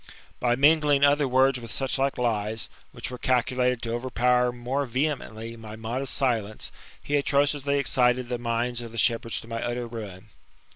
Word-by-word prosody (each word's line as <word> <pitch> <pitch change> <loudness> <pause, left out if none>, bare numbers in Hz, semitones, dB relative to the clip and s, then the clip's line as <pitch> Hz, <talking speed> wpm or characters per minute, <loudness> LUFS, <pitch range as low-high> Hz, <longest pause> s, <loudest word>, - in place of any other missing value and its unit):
By 120 -1 +2
mingling 145 0 +4
other 145 0 +4
words 130 0 +3
with 115 -1 -9
such 135 +2 -1
like 135 0 +1
lies^ 110 -2 -1 0.2
which - - -5
^ere 125 - -8
calculated 125 -1 +1
to 115 -1 -2
overpower 125 0 +2
more 125 +3 -2
vehemently 115 -4 -3
my 110 -2 -9
modest 120 +4 -3
silence, 115 -6 -1 0.3
be 145 - +1
atrociously 140 0 +1
excited 125 -2 +3
the 120 -1 -3
minds 120 +1 -1
Of 120 - -7
the 115 - -9
shepherds 115 0 +1
to - - -13
my 115 0 -4
utt^r 120 0 -3
fuin. 105 -5 -8
125 Hz, 165 wpm, -26 LUFS, 115-135 Hz, 0.3 s, mingling